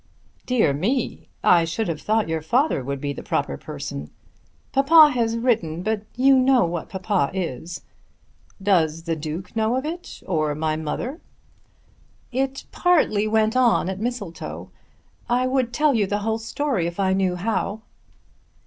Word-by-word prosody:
"Dear 240 Hz, -, +3 dB
me! 225 Hz, -, -2 dB
I 170 Hz, -1 st, +6 dB
should 165 Hz, +7 st, -2 dB
have 160 Hz, -3 st, -3 dB
thought 220 Hz, 0 st, +1 dB
your 160 Hz, -1 st, -2 dB
father 240 Hz, -, +1 dB
would 140 Hz, +1 st, -3 dB
be 140 Hz, +1 st, -3 dB
the -, -, -7 dB
proper -, -, -1 dB
person." 70 Hz, +1 st, -7 dB, 0.6 s
"Papa 295 Hz, +3 st, +7 dB
has 230 Hz, -2 st, 0 dB
written; 205 Hz, -9 st, 0 dB
but 215 Hz, 0 st, -1 dB
you 265 Hz, +2 st, +5 dB
know 255 Hz, -5 st, +4 dB
what 170 Hz, -1 st, -4 dB
papa 190 Hz, -4 st, 0 dB
is." 170 Hz, 0 st, -4 dB, 0.8 s
"Does 165 Hz, -5 st, +1 dB
the 165 Hz, -1 st, -1 dB
Duke 160 Hz, +6 st, -6 dB
know 220 Hz, +2 st, +1 dB
of 260 Hz, +2 st, -2 dB
it, 340 Hz, +3 st, -7 dB
or 155 Hz, -5 st, 0 dB
my 155 Hz, 0 st, -1 dB
mother?" 200 Hz, -, -4 dB, 1.1 s
"It 270 Hz, +1 st, -2 dB
partly 300 Hz, -, +2 dB
went 220 Hz, +1 st, +2 dB
on 240 Hz, -7 st, +3 dB
at 190 Hz, 0 st, -4 dB
Mistletoe. 220 Hz, -7 st, -5 dB, 0.6 s
I 245 Hz, +1 st, +2 dB
would 255 Hz, -2 st, 0 dB
tell 300 Hz, +3 st, +2 dB
you 210 Hz, -5 st, +2 dB
the 205 Hz, +2 st, 0 dB
whole 220 Hz, 0 st, 0 dB
story 225 Hz, -, -1 dB
if 170 Hz, +2 st, -6 dB
I 190 Hz, -1 st, +2 dB
knew 190 Hz, -2 st, +1 dB
how." 215 Hz, +2 st, -2 dB
210 Hz, 155 wpm, -23 LUFS, 165-250 Hz, 1.1 s, Papa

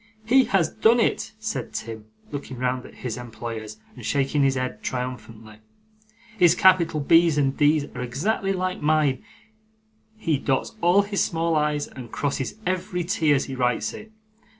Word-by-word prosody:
'He 260 Hz, +3 st, +5 dB
has 175 Hz, -5 st, +1 dB
done 230 Hz, +2 st, +4 dB
it!' 225 Hz, -, 0 dB
said 220 Hz, 0 st, -4 dB
Tim, 110 Hz, -1 st, -6 dB, 0.3 s
looking 140 Hz, -3 st, -6 dB
round 125 Hz, 0 st, -2 dB
at -, -, -16 dB
his 120 Hz, -2 st, -3 dB
employers 115 Hz, -2 st, -7 dB, 0.2 s
and 125 Hz, -, -11 dB
shaking 140 Hz, +3 st, +1 dB
his 135 Hz, -1 st, +3 dB
head 130 Hz, 0 st, -3 dB
triumphantly. 115 Hz, -4 st, -6 dB, 0.8 s
'His 175 Hz, -2 st, +6 dB
capital 170 Hz, -4 st, +4 dB
B's 165 Hz, +2 st, +4 dB
and 135 Hz, -2 st, +1 dB
D's 150 Hz, 0 st, +3 dB
are 125 Hz, -, -5 dB
exactly 190 Hz, -, -1 dB
like 185 Hz, -1 st, -2 dB
mine; 150 Hz, -3 st, +2 dB, 0.9 s
he 160 Hz, -9 st, 0 dB
dots 135 Hz, -2 st, -1 dB
all 180 Hz, +4 st, +5 dB
his 200 Hz, 0 st, 0 dB
small 165 Hz, 0 st, 0 dB
i's 150 Hz, -1 st, +1 dB
and 125 Hz, -3 st, -10 dB
crosses 140 Hz, -2 st, -2 dB
every 180 Hz, -1 st, -1 dB
t 165 Hz, -3 st, +1 dB
as 140 Hz, -2 st, +2 dB
he 135 Hz, -, -7 dB
writes 125 Hz, -4 st, 0 dB
it. 220 Hz, -, -10 dB
145 Hz, 160 wpm, -24 LUFS, 125-175 Hz, 0.9 s, His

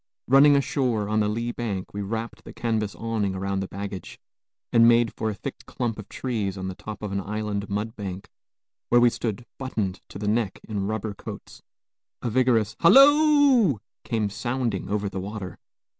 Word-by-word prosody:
Running 140 Hz, +3 st, +7 dB
ashore 125 Hz, -6 st, 0 dB
on 110 Hz, +1 st, +1 dB
the 105 Hz, -, +2 dB
lee 115 Hz, +3 st, -2 dB
bank, 105 Hz, -6 st, -4 dB
we 100 Hz, -, -3 dB
wrapped 110 Hz, +2 st, -4 dB
the -, -, -11 dB
canvas 110 Hz, -3 st, -1 dB
awning 110 Hz, -4 st, -2 dB
around 95 Hz, +1 st, -2 dB
the 95 Hz, -, -3 dB
baggage, 100 Hz, -2 st, -7 dB, 0.6 s
and 115 Hz, 0 st, +7 dB
made 120 Hz, -1 st, +4 dB
for 110 Hz, -, -2 dB
a 105 Hz, -, -3 dB
thick -, -, -7 dB
clump 115 Hz, -3 st, -3 dB
of 105 Hz, -, -9 dB
trees 105 Hz, -7 st, -3 dB
on 95 Hz, 0 st, -4 dB
the 95 Hz, -, -4 dB
top 110 Hz, +3 st, -8 dB
of 105 Hz, -, -3 dB
an 100 Hz, 0 st, -1 dB
island 105 Hz, 0 st, -3 dB
mudbank, 100 Hz, -2 st, -4 dB, 0.6 s
where 120 Hz, -, +6 dB
we 120 Hz, 0 st, +5 dB
stood 115 Hz, 0 st, -4 dB
buttoned 110 Hz, -8 st, -3 dB
to -, -, -8 dB
the 105 Hz, +1 st, -4 dB
neck 105 Hz, -2 st, 0 dB
in 100 Hz, -3 st, -2 dB
rubber 110 Hz, -1 st, -3 dB
coats. -, -, -10 dB, 0.6 s
A 120 Hz, -, -1 dB
vigorous 115 Hz, -3 st, +2 dB
"Halloo!" 275 Hz, -, +6 dB, 0.3 s
came 110 Hz, -4 st, -1 dB
sounding 120 Hz, -2 st, -2 dB
over 105 Hz, 0 st, -1 dB
the 95 Hz, -, -4 dB
water. 100 Hz, -1 st, -6 dB
110 Hz, 175 wpm, -25 LUFS, 100-120 Hz, 0.6 s, Running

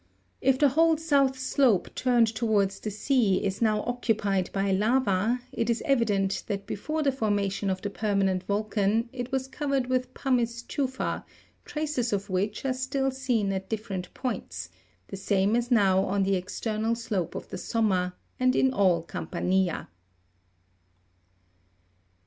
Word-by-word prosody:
If 265 Hz, 0 st, +3 dB
the 285 Hz, +1 st, +5 dB
whole 325 Hz, +3 st, +4 dB
south 280 Hz, -4 st, +2 dB
slope 255 Hz, -5 st, +2 dB
turned 245 Hz, -2 st, +3 dB
towards 215 Hz, -3 st, 0 dB
the 215 Hz, -, -4 dB
sea 210 Hz, -2 st, +1 dB
is 195 Hz, +2 st, -2 dB
now 215 Hz, -2 st, +2 dB
occupied 215 Hz, -6 st, 0 dB
by 195 Hz, 0 st, 0 dB
lava, 220 Hz, +2 st, +2 dB
it 230 Hz, 0 st, -1 dB
is 235 Hz, -, 0 dB
evident 205 Hz, -7 st, +1 dB
that 200 Hz, -1 st, -3 dB
before 310 Hz, +9 st, -3 dB
the 280 Hz, -, +3 dB
formation 205 Hz, -5 st, -1 dB
of 185 Hz, 0 st, -2 dB
the 205 Hz, -, -3 dB
permanent 195 Hz, -3 st, +1 dB
volcan 210 Hz, +2 st, 0 dB
it 250 Hz, 0 st, -5 dB
was 265 Hz, -1 st, -1 dB
covered 275 Hz, -2 st, -1 dB
with 255 Hz, 0 st, 0 dB
pumice 235 Hz, -3 st, 0 dB
tufa, 260 Hz, -1 st, -2 dB, 0.4 s
traces 300 Hz, -6 st, -2 dB
of 200 Hz, -1 st, -2 dB
which 200 Hz, +6 st, -1 dB
are 260 Hz, -, +1 dB
still 270 Hz, +1 st, -1 dB, 0.2 s
Been 215 Hz, -6 st, +2 dB
at 190 Hz, 0 st, -4 dB
different 205 Hz, -5 st, -4 dB
points, 255 Hz, -2 st, -4 dB, 0.4 s
the 195 Hz, -, -6 dB
same 195 Hz, +2 st, +1 dB
as 240 Hz, 0 st, 0 dB
now 195 Hz, -5 st, +4 dB
on 195 Hz, 0 st, 0 dB
the 195 Hz, +1 st, +1 dB
external 215 Hz, +4 st, -1 dB
slope 215 Hz, -7 st, -3 dB
of -, -, -6 dB
the -, -, -5 dB
somma, 190 Hz, -5 st, 0 dB, 0.3 s
and 255 Hz, 0 st, +3 dB
in 265 Hz, 0 st, +3 dB
all 185 Hz, -7 st, +3 dB
Campa'nia. 180 Hz, +3 st, -1 dB
220 Hz, 150 wpm, -27 LUFS, 195-255 Hz, 0.4 s, the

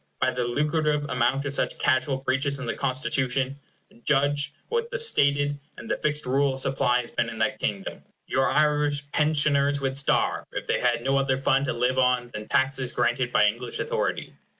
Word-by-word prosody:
By 130 Hz, 0 st, +2 dB
the 125 Hz, -1 st, -2 dB
lucrative 150 Hz, +3 st, 0 dB
amount 130 Hz, +3 st, +1 dB
of 140 Hz, -, -3 dB
such -, -, -1 dB
casual 135 Hz, 0 st, +1 dB
breaches 135 Hz, +2 st, -1 dB
in 135 Hz, -, -6 dB
the 115 Hz, -, -2 dB
Constitution, 130 Hz, 0 st, -1 dB, 0.4 s
judge 145 Hz, 0 st, +1 dB, 0.2 s
what 470 Hz, 0 st, -1 dB
the -, -, -3 dB
stated 145 Hz, -, +2 dB, 0.2 s
and 225 Hz, -, -3 dB
fixed 150 Hz, 0 st, -1 dB
rule 135 Hz, +1 st, +1 dB
of -, -, -4 dB
supply 130 Hz, -2 st, +1 dB
has 120 Hz, -, -12 dB
been -, -, -1 dB
in -, -, -8 dB
that -, -, 0 dB
kingdom. -, -, -3 dB, 0.2 s
Your 135 Hz, 0 st, +1 dB
Irish 150 Hz, -1 st, +2 dB
pensioners 145 Hz, -2 st, +2 dB
would 135 Hz, -1 st, -2 dB
starve, 140 Hz, 0 st, +1 dB
if -, -, -4 dB
they -, -, 0 dB
had 120 Hz, -1 st, +1 dB
no 135 Hz, +1 st, +2 dB
other 135 Hz, -1 st, +1 dB
fund 135 Hz, +1 st, +2 dB
to -, -, -1 dB
live 125 Hz, +2 st, 0 dB
on 125 Hz, -1 st, +1 dB
than 105 Hz, 0 st, -6 dB
taxes 130 Hz, -1 st, 0 dB
granted 120 Hz, +1 st, 0 dB
by 105 Hz, -, +4 dB
English 120 Hz, +3 st, -1 dB
authority. -, -, -2 dB
135 Hz, 185 wpm, -25 LUFS, 125-145 Hz, 0.4 s, by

